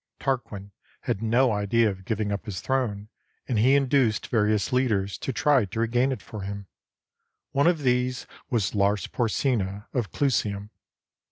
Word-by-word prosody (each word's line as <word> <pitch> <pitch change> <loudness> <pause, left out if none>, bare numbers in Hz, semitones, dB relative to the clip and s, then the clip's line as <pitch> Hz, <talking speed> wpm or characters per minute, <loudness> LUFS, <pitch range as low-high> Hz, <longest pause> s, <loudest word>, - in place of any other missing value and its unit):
Tarquin 115 -7 -3 0.3
had 95 - -2
no 120 +3 +3
idea 105 +2 +2
of 95 -2 -4
giving 105 -1 -1
up 100 +2 -4
his 95 -4 -4
throne, 115 -6 -1 0.4
and 120 -5 0
he 130 +5 +5
induced 130 -5 +2
various 105 +1 +1
leaders 105 -7 +1
to - - -3
try 135 -3 +3
to 100 +4 -6
regain 120 +3 +2
it 130 - -5
for 110 -3 -8
him. 100 +1 -6 0.9
One 140 +3 +3
of 165 -4 +2
these 125 -1 +1 0.2
was 110 -5 0
Lars 100 0 +1
Porsena 105 -4 -1
of 115 -9 -1
Clusium. 105 -7 -1
115 Hz, 155 wpm, -26 LUFS, 100-130 Hz, 0.9 s, he